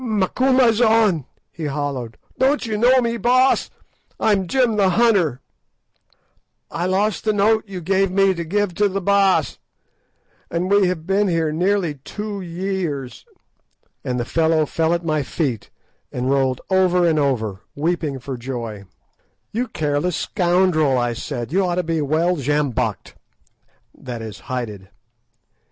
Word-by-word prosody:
"Macumazahn," 225 Hz, -, +3 dB, 0.3 s
he 165 Hz, -, -6 dB
halloed, 140 Hz, -5 st, -3 dB, 0.2 s
"don't 270 Hz, +1 st, +2 dB
you 220 Hz, -2 st, -2 dB
know 250 Hz, +4 st, +4 dB
me, 235 Hz, -1 st, -1 dB
Baas? 255 Hz, +3 st, +3 dB, 0.5 s
I'm 200 Hz, -4 st, +2 dB
Jim 245 Hz, 0 st, +2 dB
the 200 Hz, -2 st, +3 dB
hunter. 185 Hz, -, +2 dB, 1.3 s
I 170 Hz, +4 st, -2 dB
lost 200 Hz, +3 st, 0 dB
the 215 Hz, -, +2 dB
note 215 Hz, +2 st, +2 dB
you 190 Hz, -2 st, -7 dB
gave 195 Hz, +3 st, +1 dB
me 195 Hz, +1 st, +3 dB
to 170 Hz, -2 st, -4 dB
give 200 Hz, +3 st, -1 dB
to 205 Hz, +3 st, +2 dB
the 195 Hz, +1 st, -2 dB
Baas, 195 Hz, 0 st, +2 dB, 0.9 s
and 180 Hz, +3 st, -2 dB
we 200 Hz, -2 st, +4 dB
have 170 Hz, -3 st, -3 dB
been 195 Hz, +2 st, +1 dB
here 165 Hz, -3 st, 0 dB
nearly 175 Hz, -2 st, 0 dB
two 210 Hz, -1 st, -5 dB
years." 170 Hz, -7 st, -4 dB, 0.8 s
And 125 Hz, -1 st, -2 dB
the 120 Hz, -, -2 dB
fellow 160 Hz, +2 st, +2 dB
fell 165 Hz, +3 st, 0 dB
at 170 Hz, 0 st, -5 dB
my 155 Hz, -2 st, +1 dB
feet, 130 Hz, -, -3 dB, 0.4 s
and 125 Hz, +2 st, -2 dB
rolled 130 Hz, -2 st, +1 dB
over 180 Hz, -2 st, +3 dB
and 160 Hz, -2 st, +2 dB
over, 110 Hz, -9 st, -1 dB
weeping 155 Hz, -2 st, -1 dB
for 130 Hz, +1 st, -6 dB
joy. 115 Hz, -5 st, -6 dB, 0.7 s
"You 245 Hz, +4 st, -2 dB
careless 155 Hz, -3 st, -1 dB
scoundrel!" 175 Hz, -7 st, +2 dB
I 120 Hz, -1 st, 0 dB
said; 120 Hz, +1 st, -5 dB
"you 190 Hz, +3 st, +2 dB
ought 175 Hz, -1 st, 0 dB
to 180 Hz, -, 0 dB
be 165 Hz, -1 st, -1 dB
well 160 Hz, +5 st, +1 dB
sjambocked"—that 125 Hz, -2 st, -5 dB
is, 110 Hz, -2 st, -8 dB
hided. 105 Hz, -7 st, -6 dB
175 Hz, 140 wpm, -21 LUFS, 140-200 Hz, 1.3 s, know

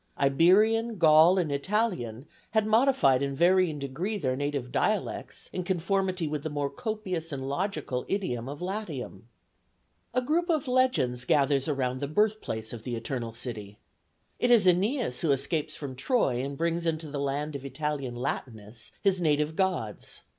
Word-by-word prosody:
Iberian, 210 Hz, +11 st, +4 dB
Gaul, 160 Hz, +2 st, +6 dB
and 170 Hz, -5 st, 0 dB
Italian 140 Hz, -, -1 dB, 0.3 s
had 220 Hz, -1 st, +3 dB
modified 220 Hz, -, +4 dB
in 140 Hz, -1 st, -1 dB
varying 175 Hz, 0 st, +3 dB
degree 150 Hz, +10 st, -3 dB
their 130 Hz, -8 st, -1 dB
native 140 Hz, -2 st, -3 dB
dialects -, -, -2 dB
in 180 Hz, -, -2 dB
conformity 185 Hz, -1 st, 0 dB
with 150 Hz, -1 st, -3 dB
the 155 Hz, -, -4 dB
more 145 Hz, -1 st, -2 dB
copious 190 Hz, -8 st, -4 dB
and 135 Hz, -2 st, -4 dB
logical 145 Hz, -5 st, -2 dB
idiom 135 Hz, -, -2 dB
of 145 Hz, +4 st, -7 dB
Latium. 205 Hz, +4 st, -5 dB, 0.9 s
A 255 Hz, -, +2 dB
group 335 Hz, +7 st, 0 dB
of 310 Hz, -5 st, +1 dB
legends 250 Hz, -, +1 dB
gathers 140 Hz, 0 st, +2 dB
round 130 Hz, -3 st, -1 dB
the 140 Hz, -, -2 dB
birthplace 155 Hz, -, -1 dB
of 115 Hz, -, -7 dB
the 120 Hz, +1 st, -4 dB
Eternal 115 Hz, 0 st, -4 dB
City. 105 Hz, -4 st, -5 dB, 0.6 s
It 245 Hz, -, +2 dB
is 230 Hz, -5 st, +6 dB
Æneas 190 Hz, -, +2 dB
who 165 Hz, -, 0 dB
escapes 155 Hz, +3 st, 0 dB
from 140 Hz, -3 st, -6 dB
Troy 135 Hz, -, +1 dB
and 140 Hz, 0 st, -5 dB
brings 170 Hz, +1 st, -1 dB
into 160 Hz, -1 st, -1 dB
the 145 Hz, -1 st, -4 dB
land 140 Hz, +2 st, -2 dB
of 140 Hz, -, -6 dB
Italian 140 Hz, -2 st, -3 dB
Latinus 110 Hz, -3 st, -5 dB
his 190 Hz, -3 st, +2 dB
native 150 Hz, -1 st, +1 dB
gods. 180 Hz, -, -2 dB
155 Hz, 155 wpm, -28 LUFS, 135-190 Hz, 0.9 s, Gaul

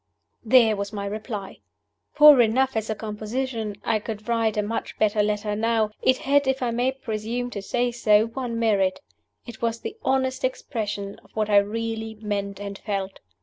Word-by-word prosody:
There 230 Hz, -2 st, +5 dB
was 200 Hz, 0 st, -4 dB
my 200 Hz, -2 st, -4 dB
reply! 210 Hz, -1 st, -5 dB, 0.6 s
Poor 300 Hz, -4 st, +9 dB
enough 255 Hz, +3 st, +2 dB
as 220 Hz, 0 st, -2 dB
a 220 Hz, -, -1 dB
composition 220 Hz, +1 st, -4 dB
(I 220 Hz, -, +1 dB
could 215 Hz, 0 st, -7 dB
write 230 Hz, -2 st, +1 dB
a 210 Hz, -, +2 dB
much 225 Hz, +2 st, -4 dB
better 210 Hz, 0 st, +2 dB
letter 210 Hz, 0 st, -1 dB
now), 220 Hz, 0 st, +1 dB
it 260 Hz, -, +3 dB
had, 285 Hz, 0 st, +2 dB
if 265 Hz, -1 st, 0 dB
I 240 Hz, -, 0 dB
may 245 Hz, +3 st, +1 dB
presume 245 Hz, -1 st, -4 dB
to 200 Hz, -, -5 dB
say 245 Hz, +4 st, 0 dB
so, 215 Hz, -2 st, +4 dB
one 235 Hz, 0 st, -4 dB
merit. 200 Hz, -5 st, +2 dB, 0.5 s
It 235 Hz, -3 st, -10 dB
was 230 Hz, 0 st, -1 dB
the 440 Hz, -, -6 dB
honest 265 Hz, -, 0 dB
expression 210 Hz, -, -3 dB
of -, -, -22 dB
what 215 Hz, -1 st, 0 dB
I 205 Hz, -, +6 dB
really 220 Hz, +2 st, -1 dB
meant 200 Hz, -2 st, -4 dB
and 200 Hz, -1 st, -6 dB
felt. 195 Hz, -2 st, -4 dB
220 Hz, 180 wpm, -24 LUFS, 210-245 Hz, 0.6 s, Poor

